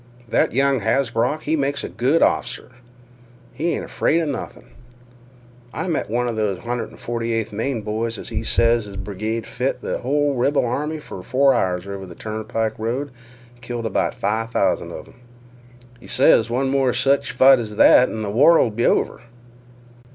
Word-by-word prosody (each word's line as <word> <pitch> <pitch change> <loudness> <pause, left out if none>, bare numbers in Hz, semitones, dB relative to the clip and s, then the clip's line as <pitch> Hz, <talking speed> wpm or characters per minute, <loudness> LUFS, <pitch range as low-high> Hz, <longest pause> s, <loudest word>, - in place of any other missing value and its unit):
"That - - +1
young 135 +2 +2
Hasbrouck, 125 +5 0
he 155 - 0
makes 140 -1 -1
a - - -3
good 125 - +1
off'cer. - - -1 0.8
He 170 +2 -1
ain't - - -5
afraid 165 - +1
'a 165 - 0
nothin'." 145 -3 -6 1.0
"I - - -3
met 160 - -2
one 120 +2 0
of 120 - -2
th' 105 -4 -1
148th 115 -1 -3
Maine 115 +2 -3
boys 110 +2 -3
an' - - -7
he - - -4
ses 115 -1 +2
his 100 -1 -10
brigade 110 +3 -4
fit 125 +2 -2
th' - - -3
hull 145 +3 +1
rebel 135 +2 +1
army 150 +6 -2
fer 95 - -9
four 135 +7 +3
hours 90 -5 -1
over 100 0 -6
on 95 - -9
th' 85 - -12
turnpike 110 0 -3
road 125 +6 -3 0.4
an' 120 - -25
killed 120 -1 -5
about 110 - -1
five 110 +3 -2
thousand - - 0
of - - -9
'em. - - -19 0.8
He - - -14
ses 115 - +4
one 130 +3 0
more 135 -2 +2
sech 135 +3 +2
fight 130 +1 +5
as 105 -2 -5
that 125 +4 +6
an' 110 -1 -4
th' 100 - -3
war 150 +8 +6
'll 115 - +2
be 120 +3 0
over." - - 0
120 Hz, 180 wpm, -21 LUFS, 110-135 Hz, 1.0 s, that